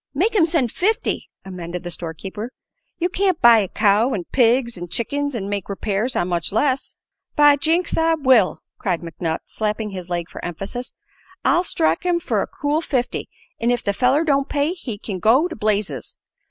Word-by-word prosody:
"Make 390 +10 +2
him 355 -7 +4
send 305 -9 +1
fifty," 430 +4 -1 0.2
amended 180 -2 -6
the 175 - -5
store 165 -1 -4
keeper. 210 +7 -6 0.5
"You 350 - +1
can't 370 -1 +1
buy 235 -1 +7
a 200 - 0
cow, 210 +6 +2
an' 185 - -3
pigs, 240 -1 +3
an' 175 -1 -6
chickens, 285 +9 -2
an' 200 -4 -3
make 200 -2 -3
repairs 205 +5 -1
on 175 - +1
much 175 -2 -1
less." 260 +5 0 0.4
"By 295 -1 +7
jinks, 330 +5 +1
I 325 0 +3
will!" 260 -10 +4 0.2
cried 180 -4 -1
McNutt, 165 -1 -3
slapping 215 0 -3
his 185 -2 -7
leg 175 -1 -2
for - - -10
emphasis. 195 +9 -5 0.5
"I'll 350 - +4
strike 160 - +1
him 355 -1 +1
fer - - 0
a - - -2
cool 295 +2 -1
fifty, 255 -6 -2 0.3
an' 235 - +1
if 245 0 +1
the 200 - 0
feller 255 +8 +3
don't 280 -3 +1
pay 290 +2 +1
he 270 - -5
kin 200 -2 -5
go 255 - +4
to 335 - -7
blazes. 210 -1 -1
235 Hz, 190 wpm, -21 LUFS, 195-290 Hz, 0.5 s, buy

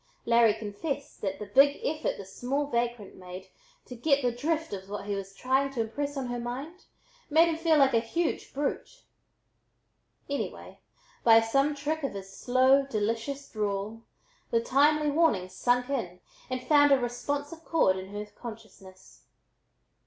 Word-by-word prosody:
Larry 235 -2 +5
confessed 230 +8 -5
that 195 -1 -2
the 210 - -6
big 275 +7 +4
effort 310 +1 -1
this 195 -1 -10
small 275 +4 -1
vagrant 235 -5 -2
made 185 +1 -10 0.4
"to - - -9
get 280 +3 +2
the 245 - +2
drift" 310 +4 -2
of 190 0 -7
what 205 -1 -5
he 205 - -2
was 195 -1 -5
trying 265 +5 +1
to 240 - -1
impress 285 +6 -3
on 270 - -2
her 245 0 -3
mind, 270 +9 -6 0.4
made 320 +3 +5
him 325 - 0
feel 325 -1 +3
like 270 -2 +5
a 230 - +5
huge 310 +9 -2
brute. 295 - -4 1.2
Anyway, 280 0 -5 0.4
by 225 -1 +8
some 275 +6 +1
trick 300 +3 -2
of 275 -7 -3
his 195 0 -8
slow, 260 +2 +4
delicious 230 +5 -2
drawl, 210 +1 -3 0.5
the 230 - +2
timely 295 +5 +3
warning 285 - +2
"sunk 245 +6 +1
in" 180 -10 -3 0.3
and 255 0 -3
found 290 -1 +5
a 275 - +7
responsive 285 +6 -3
chord 320 - +3
in 190 0 -7
her 205 +1 -5
consciousness. 210 -4 -12
245 Hz, 160 wpm, -28 LUFS, 210-285 Hz, 1.2 s, by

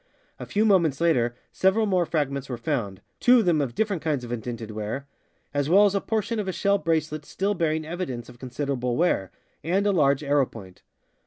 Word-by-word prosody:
A - - -7
few 210 +2 +1
moments 170 -9 +3
later 125 -8 +2 0.2
several 190 +4 +2
more 185 -4 +1
fragments 140 -4 -2
were 125 - -3
found 115 -7 -3 0.2
(two 250 +1 +6
of 230 - +3
them 165 -4 +3
of 125 -4 -3
different 205 -6 0
kinds 150 -5 -1
of 120 - -7
indented 115 -1 -5
ware), 110 +6 -4 0.5
as 145 0 0
well 200 +4 +6
as 200 - +2
a 200 - 0
portion 225 +1 -1
of 205 - -3
a - - 0
shell 200 +2 +1
bracelet 155 -2 -1
still 195 +6 -1
bearing 160 -4 -1
evidence 155 -9 -5
of 120 -1 -14
con 130 - -7
siderable 125 -2 -2
wear, 140 - +1 0.3
and 190 +5 +1
a 205 - +3
large 140 -5 +2
arrowpoint. 125 -10 -1
150 Hz, 200 wpm, -25 LUFS, 125-185 Hz, 0.5 s, two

